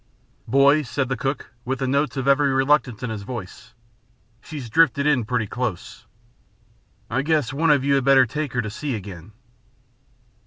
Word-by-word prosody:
"Boys," 140 +2 +3
said 135 0 -2
the 130 - 0
cook, 135 +3 -4
with 130 +2 -2
the 135 - -2
notes 140 0 0
of 135 0 -2
every 140 0 +3
reluctance 135 -3 +1
in 125 - -3
his 110 -2 -5
voice, 110 0 -9 0.7
"she's 145 -6 -8
drifted 140 0 +3
in 140 -6 +2
pretty 120 -1 -1
close. 110 -3 -5 1.0
I 125 +3 -1
guess 150 -4 0
one 160 +4 +1
of 145 -3 +4
you 140 0 +2
had 135 -1 +2
better 135 -1 +5
take 150 +3 -4
her 125 -1 0
to 110 - -5
sea 135 +3 -4
again." 95 -2 -9
135 Hz, 170 wpm, -22 LUFS, 120-140 Hz, 1.0 s, better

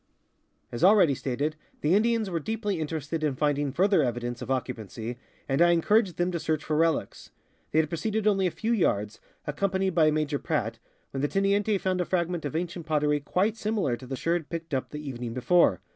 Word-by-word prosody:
As 120 - -4
already 185 -6 +6
stated, 140 +4 -2 0.3
the 150 +4 +2
Indians 225 +1 +2
were 175 -3 -2
deeply 210 0 -2
interested 155 0 -3
in 145 -3 +1
find 145 +1 +1
ing 145 -2 -1
further 195 +7 +3
evidence 120 -1 -2
of - - -6
occupancy, 120 -2 -4 0.3
and 135 +3 +1
I 175 0 +6
encouraged 195 +3 +2
them 175 +1 +1
to 170 - -2
search 155 -1 -1
for 155 - -1
relics. 165 0 0 0.4
They - - -1
had 160 0 +4
proceeded 210 +6 -2
only 195 -3 +3
a - - +1
few 220 +6 -3
yards, 105 - 0 0.3
accom 185 +6 -1
panied 190 -1 +1
by 160 -2 +5
Major 150 -1 0
Pradt, - - -2 0.3
when 135 - -3
the 145 - +2
teniente 200 +3 +1
found 185 -1 0
a - - -1
fragment 175 -2 -1
of 145 - -4
ancient 175 0 -3
pottery 150 -1 +2
quite 190 +9 0
similar 210 - 0
to 130 +1 -11
the 135 - -3
sherd 165 +2 -1
picked 165 -2 -6
up 130 - -1
the 150 0 -7
evening 120 -3 -5
before. 130 - +3
160 Hz, 205 wpm, -27 LUFS, 140-190 Hz, 0.4 s, already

